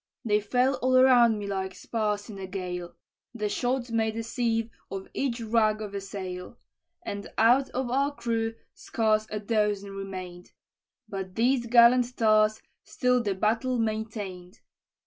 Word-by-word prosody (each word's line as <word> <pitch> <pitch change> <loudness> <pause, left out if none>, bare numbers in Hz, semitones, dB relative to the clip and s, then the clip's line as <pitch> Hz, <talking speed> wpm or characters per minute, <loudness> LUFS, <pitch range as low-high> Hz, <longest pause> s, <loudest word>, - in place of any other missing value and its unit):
"They 210 -2 +3
fell 250 +6 +1
all 255 0 +3
around 245 -4 +6
me 205 - -5
like 190 -1 -3
spars 210 0 -2
in 205 -4 -9
a 190 - -6
gale; 180 -2 -5 0.4
The 210 -2 -1
shot 245 +2 -1
made 220 -1 0
a 230 - -2
sieve 230 0 -1 0.2
of 195 0 -6
each 255 -3 -1
rag 215 -1 +2
of 210 -2 -6
a 200 - -3
sail; 185 -2 -7 0.5
And 200 0 -5
out 245 +5 +4
of 255 -1 -3
our 275 +2 +1
crew 225 -2 -2 0.2
scarce 215 -1 0
a 210 - -3
dozen 210 -2 0
remain'd; 185 -2 -8 0.5
But 190 -2 -6
these 240 +1 +2
gallant 240 +1 +5
tars 215 -1 +3 0.2
still 250 -1 +1
the 200 -4 -1
battle 225 +6 0
maintain'd. 215 -5 -4
220 Hz, 150 wpm, -27 LUFS, 200-235 Hz, 0.5 s, around